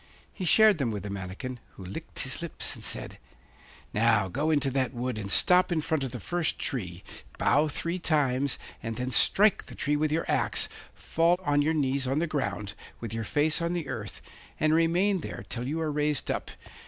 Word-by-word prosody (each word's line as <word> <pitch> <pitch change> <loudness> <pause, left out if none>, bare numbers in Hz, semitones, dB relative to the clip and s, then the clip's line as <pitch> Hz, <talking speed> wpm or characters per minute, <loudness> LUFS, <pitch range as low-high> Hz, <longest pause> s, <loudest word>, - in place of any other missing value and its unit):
He 185 - -5
shared 215 0 +6
them 130 -4 0
with 105 -2 -4
the 100 - -5
manikin, 100 +6 -6
who 95 - -11
licked 95 - -6
his - - -3
lips - - -3
and - - -11
said: - - -5 0.7
'Now, 110 -3 +3
go 145 - -1
into 145 -3 +2
that 130 -1 -1
wood, 120 -2 -3
and 100 -2 -4
stop 180 - +5
in 170 - +1
front 155 -1 -1
of 130 - -3
the 125 - -6
first 175 - -1
tree, 90 -8 -4 0.3
bow 150 +2 +3
three 170 +4 -2
times, 140 -5 +1 0.2
and 115 0 -4
then 125 +2 -3
strike 210 +9 +4
the - - -10
tree 145 +1 0
with 150 0 0
your 165 +2 0
axe, - - +2 0.3
fall 170 +2 +1
on 145 -3 +2
your 160 +2 +1
knees 135 -2 0
on 135 +2 0
the 165 - +1
ground, 135 -10 -3 0.3
with 115 -2 -6
your 115 0 -2
face 150 +7 +1
on 170 +1 -1
the 170 -5 -3
earth, 110 -5 -6 0.4
and 155 0 +3
remain 175 +4 +3
there - - -7
till 125 +1 -3
you 155 +4 -2
are 160 -2 -1
raised 150 -1 0
up. - - -3
145 Hz, 205 wpm, -28 LUFS, 120-160 Hz, 0.7 s, shared